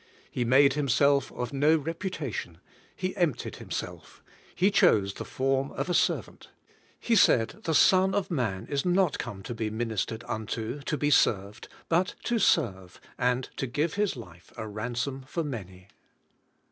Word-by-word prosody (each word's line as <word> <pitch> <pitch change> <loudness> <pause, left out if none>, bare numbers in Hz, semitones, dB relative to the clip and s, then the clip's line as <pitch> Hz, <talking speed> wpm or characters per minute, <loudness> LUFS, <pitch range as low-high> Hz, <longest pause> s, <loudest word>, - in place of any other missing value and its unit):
He 125 - -1
made 130 +3 +5
Himself 140 0 +2
of 125 +2 -4
no 150 +3 +4
reputation; 155 - -4 0.4
He 185 -1 -3
emptied 175 - -1
Himself; - - -7 0.3
He 190 +3 +3
chose 105 - +4
the - - -7
form 135 +1 0
of 180 - -3
a - - +1
servant. - - 0 0.5
He 235 - +1
said: 125 - +4
"The 160 - +1
Son 190 +4 +5
of 200 -2 -1
Man 115 - -1
is 140 -1 -1
not 180 -3 +2
come 105 -6 -6
to 120 - -5
be 110 -2 -3
ministered 110 0 -3
unto, 110 +5 -4
to 150 +2 -2
be 145 0 +1
served, 105 -3 +2 0.2
but 175 +2 +1
to 240 -1 0
serve, 95 - +1 0.2
and 125 0 +1
to 135 - -2
give 150 +7 -1
His 205 -4 0
life 90 -8 -12
a 110 - -5
ransom 120 +5 -3
for 165 +3 -2
many." 95 - -7
135 Hz, 160 wpm, -28 LUFS, 110-165 Hz, 0.5 s, made